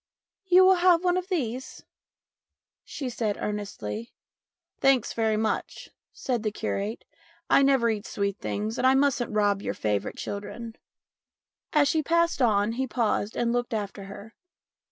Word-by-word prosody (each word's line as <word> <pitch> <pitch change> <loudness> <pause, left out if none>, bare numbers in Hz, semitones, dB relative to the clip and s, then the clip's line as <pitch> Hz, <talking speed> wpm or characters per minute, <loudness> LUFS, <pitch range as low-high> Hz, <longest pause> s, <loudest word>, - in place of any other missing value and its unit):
"You 370 +1 +7
will 375 0 +6
have 355 -1 +5
one 360 -1 +2
of 365 0 -2
these?" 265 - -4 1.0
she 275 - -6
said 225 -4 -2
earnestly. 210 - -5 0.3
" - - -61
Thanks 270 -4 +3
very 220 -1 +1
much," 220 0 -3 0.2
said 245 -4 -2
the 215 - 0
curate, 205 +1 -3 0.2
" 335 0 -33
I - - +6
never 270 -4 +3
eat 210 -1 -4
sweet 200 0 -2
things, 215 +3 -3
and 255 - +3
I 265 - +5
mustn't 270 -4 +1
rob 205 -2 +1
your - - -3
favourite 105 -1 -2
children." 220 +3 -6 1.0
As 295 -2 +4
she 315 +2 +2
passed 335 0 +1
on 210 -3 +3
he 260 +3 -2
paused 225 -3 -1
and 235 0 +1
looked 245 -1 -1
after 200 -2 -5
her. 200 +3 -10
235 Hz, 155 wpm, -26 LUFS, 210-275 Hz, 1.0 s, You